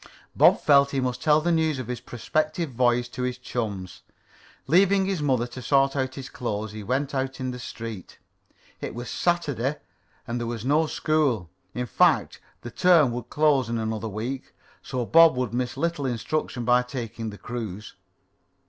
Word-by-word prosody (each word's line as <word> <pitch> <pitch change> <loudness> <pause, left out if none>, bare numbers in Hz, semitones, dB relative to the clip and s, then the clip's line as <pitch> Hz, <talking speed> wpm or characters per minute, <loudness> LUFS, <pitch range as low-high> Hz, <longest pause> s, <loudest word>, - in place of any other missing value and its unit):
Bob - - +6
felt 140 -1 +5
he 140 - -1
must 125 -1 -2
tell 155 0 +4
the 175 +2 +1
news 160 -3 +1
of 130 - -4
his 125 +1 -4
prospective 155 +5 -2
voyage 120 0 +2
to 125 - -6
his 125 0 -2
chums. 100 -8 -5 0.6
Leaving 190 +5 +4
his 190 -4 -1
mother 130 -5 +1
to 125 +1 -9
sort 135 +1 +2
out 130 -1 -1
his 135 -1 -7
clothes, 110 -3 -4
he 110 0 -7
went 135 +7 -1
out 130 -1 -2
in 130 -1 -2
the 125 - -7
street. 115 -5 -8 0.6
It - - -6
was 120 0 -6
Saturday 150 -6 0 0.5
and 120 -1 -3
there 120 - -3
was 115 -1 -5
no 155 +4 +3
school. 140 - 0 0.2
In 125 - -2
fact, - - +2 0.2
the 120 - -8
term 165 -3 +4
would 120 0 -6
close 145 -5 +2
in 115 - -1
another 110 0 -3
week, 120 +6 -5 0.3
so 125 -3 -3
Bob 165 +2 +6
would 125 -3 -2
miss 125 0 -2
little 165 -5 -1
instruction 125 0 -2
by 125 +1 +4
taking 115 -3 -5
the 105 - -9
cruise. 110 -4 -6
125 Hz, 175 wpm, -25 LUFS, 115-145 Hz, 0.6 s, Bob